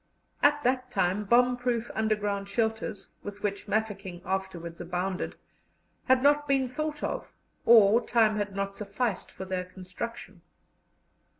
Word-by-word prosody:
At 290 0 +4
that 255 0 +1
time 195 -2 0
bomb 245 +3 +4
proof 240 -2 -1
underground 205 -2 -1
shelters, 220 -2 -1
with 205 0 -8
which 200 -1 -2
Mafeking 200 -5 -2
afterwards 185 -3 -4
abounded, 180 +2 -3 0.7
had 260 0 +4
not 290 +1 +4
been 270 -2 +2
thought 300 +3 -4
of, - - -3 0.4
or 225 0 +7
time 220 -2 +3
had 205 -1 -2
not 195 0 -2
sufficed 210 0 -2
for 190 - -8
their 185 -1 -2
construction. 185 +1 -8
210 Hz, 130 wpm, -28 LUFS, 195-245 Hz, 0.7 s, or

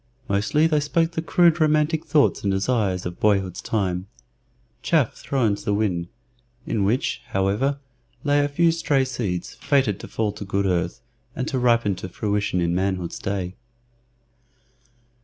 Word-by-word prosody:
Mostly 105 +10 +2
they 155 -2 +3
spoke 165 +3 +1
the 165 - -2
crude 170 -1 +3
romantic 155 +1 +2
thoughts 150 -1 +3
and 100 - 0
desires 95 -2 0
of 90 0 -5
boyhood's 95 -4 +1
time 95 -3 -1 0.7
chaff 155 -8 +2
thrown 125 -7 0
to 100 - -6
the 100 - 0
wind, 90 -5 0 0.6
in 105 -4 0
which, 120 +6 0
however, 100 +9 0 0.5
lay 145 0 +3
a - - +1
few 165 +3 +3
stray 145 -5 +1
seeds, 110 -9 -3
fated 130 -9 +1
to - - -8
fall 110 -2 -1
to 105 0 -8
good 100 0 -1
earth, 90 -2 -1 0.3
and 130 - -3
to 135 -4 -1
ripen 115 -4 +3
to 95 - -6
fruition 100 -1 -1
in 85 -1 +1
manhood's 90 -1 -1
day. 95 -2 -3
105 Hz, 155 wpm, -23 LUFS, 95-145 Hz, 0.7 s, they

